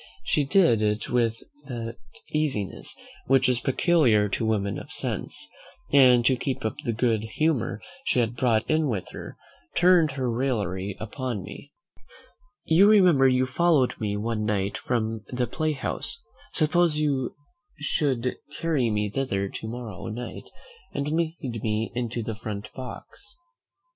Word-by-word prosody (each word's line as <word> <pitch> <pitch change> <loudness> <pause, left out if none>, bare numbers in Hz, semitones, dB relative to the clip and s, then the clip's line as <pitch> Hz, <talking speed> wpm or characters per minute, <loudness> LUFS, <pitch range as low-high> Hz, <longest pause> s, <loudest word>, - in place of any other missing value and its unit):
She 145 - +1
did 140 - +4
it 105 0 0
with 115 -2 +1 0.2
that 115 -2 -5 0.3
easiness 140 -11 -1 0.3
which 135 0 +4
is 125 -2 +3
peculiar 125 - +3
to 110 - -1
women 105 -3 0
of - - -11
sense; - - -4 0.5
and 125 -4 +7
to 130 - +5
keep 130 -1 -3
up 110 - 0
the 120 - 0
good 115 -1 +1
humour 145 -9 +1 0.3
she 125 - +2
had 120 0 0
brought 115 -3 +2
in 155 -1 +2
with 105 -8 -3
her, - - -9 0.4
turned 170 -4 +5
her 130 -2 -2
raillery 105 -6 -1
upon 115 -1 -4
me. - - -10
"Mr. - - -37
Bickerstaff, - - -33 0.6
you 175 +5 +6
remember 180 -10 +6
you 130 0 +3
followed 145 -1 +3
me 105 -1 -1
one 110 0 -2
night 100 -2 0
from 110 -2 -1
the 125 0 -1
play 155 +4 -1
house; 150 - -3 0.3
suppose 165 0 +3
you 140 -4 0 0.4
should 135 -4 0 0.2
carry 150 -8 +1
me 105 -1 0
thither 100 -4 -1
to 110 - -6
morrow 115 -3 -6
night, 120 +2 -6 0.5
and 140 +1 -1
lead 155 -8 -2
me 110 0 -1
into 120 -1 -2
the 110 - -3
front 105 -1 -6
box." 130 - -9
125 Hz, 150 wpm, -26 LUFS, 110-145 Hz, 0.6 s, and